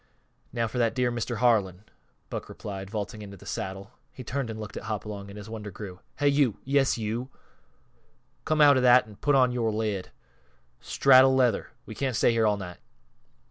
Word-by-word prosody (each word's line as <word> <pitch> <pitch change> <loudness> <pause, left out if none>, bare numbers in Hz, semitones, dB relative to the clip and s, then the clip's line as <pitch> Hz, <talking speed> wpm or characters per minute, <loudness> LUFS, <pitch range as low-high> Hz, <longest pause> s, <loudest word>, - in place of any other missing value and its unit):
Now 115 -1 -1
for 125 - -4
that 115 0 +1
dear 125 -1 +1
Mr. 120 0 -3
Harlan," 105 -5 +2 0.5
Buck - - -5
replied, 95 -1 -7
vaulting 105 +1 -5
into 100 -1 -9
the - - -15
saddle. 95 +3 -5 0.2
He 130 - -10
turned 135 0 -3
and 110 -1 -6
looked 105 -1 -8
at - - -6
Hopalong, 105 -1 -5
and 100 - -10
his 105 0 -9
wonder 110 -2 -7
grew. 95 -2 -9 0.2
"Hey, 145 - +3
you! 140 -6 +2
Yes, 135 -1 +2
you! 115 +3 -3 1.1
Come 155 -1 +1
out 145 -2 +7
of - - +2
that 125 -1 +6
an' 105 -2 -14
put 145 -1 +2
on 130 -2 +4
yore 120 -2 0
lid! 105 -3 -2 0.7
Straddle 130 -1 +5
leather 125 -3 +2 0.2
we 110 - -8
can't 130 +1 -2
stay 120 - +3
here 115 -1 +2
all 105 -1 +2
night." 90 -3 -8
110 Hz, 190 wpm, -27 LUFS, 105-125 Hz, 1.1 s, out